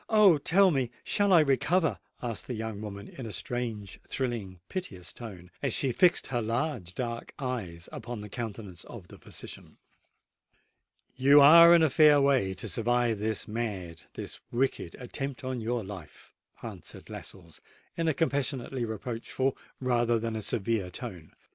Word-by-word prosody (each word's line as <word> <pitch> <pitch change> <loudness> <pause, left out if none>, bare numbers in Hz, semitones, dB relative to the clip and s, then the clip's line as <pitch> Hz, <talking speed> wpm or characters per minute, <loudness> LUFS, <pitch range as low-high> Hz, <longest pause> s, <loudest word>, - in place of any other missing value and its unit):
Oh! 205 -8 +6
tell 190 +6 +4
me—shall 150 - 0
I 170 -3 +8
recover?" 155 +4 +2 0.2
asked 115 -3 -3
the 125 - -3
young 110 -2 -5
woman 100 -1 -7
in 130 -4 -8
a - - -6
strange, 110 -2 -4
thrilling, 115 -8 -3
piteous 100 - -6
tone, 95 -7 -10
as 140 -5 0
she 135 - +1
fixed 175 +8 +4
her 120 -2 -1
large 115 - -2
dark 115 -2 -4
eyes 105 - -4
upon 120 -2 -6
the 105 - -7
countenance 105 -4 -6
of 95 -7 -11
the - - -13
physician. - - -11 1.4
"You 140 +3 +6
are 170 +4 +10
in 165 - +5
a 160 - +4
fair 150 0 +6
way 130 -9 +2
to 100 +4 -5
survive 115 +2 +1
this 110 0 -1
mad—this 100 -7 -5
wicked 120 -8 -1
attempt 135 +2 -5
upon 130 -2 -3
your 115 +1 -1
life," 100 -1 -11 0.3
answered - - -8
Lascelles, 85 -5 -10 0.3
in 165 - -1
a 160 - +3
compassionately 135 -4 -1
reproachful 115 +4 -2 0.2
rather 120 -2 +2
than 115 0 -3
a 110 - -3
severe 105 -2 -1
tone. 85 -2 -8
120 Hz, 150 wpm, -29 LUFS, 105-135 Hz, 1.4 s, are